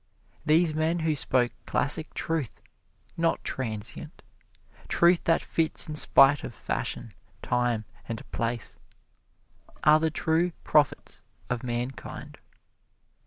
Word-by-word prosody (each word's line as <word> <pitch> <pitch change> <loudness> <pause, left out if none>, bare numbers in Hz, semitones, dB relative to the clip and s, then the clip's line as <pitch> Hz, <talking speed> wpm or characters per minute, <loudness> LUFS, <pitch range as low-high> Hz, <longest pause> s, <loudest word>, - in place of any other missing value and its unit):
These 160 +1 +4
men 160 +2 0
who 160 -1 +1
spoke 125 -3 +2 0.2
classic 145 +2 0
truth, 160 -7 -3 0.6
not 165 0 0
transient 110 -5 -6 0.6
truth 170 0 +3
that 165 - +2
fits 160 -1 +1
in 155 - -5
spite 145 -1 +5
of 115 - -7
fashion, - - -4 0.3
time 120 -3 0 0.2
and 115 -1 -5
place 115 0 -3 1.0
are 155 +1 +6
the 160 0 +1
true 165 +2 0
prophets 150 -2 +1 0.3
of 125 -1 -1
mankind. 125 +1 -5
150 Hz, 110 wpm, -27 LUFS, 120-160 Hz, 1.0 s, are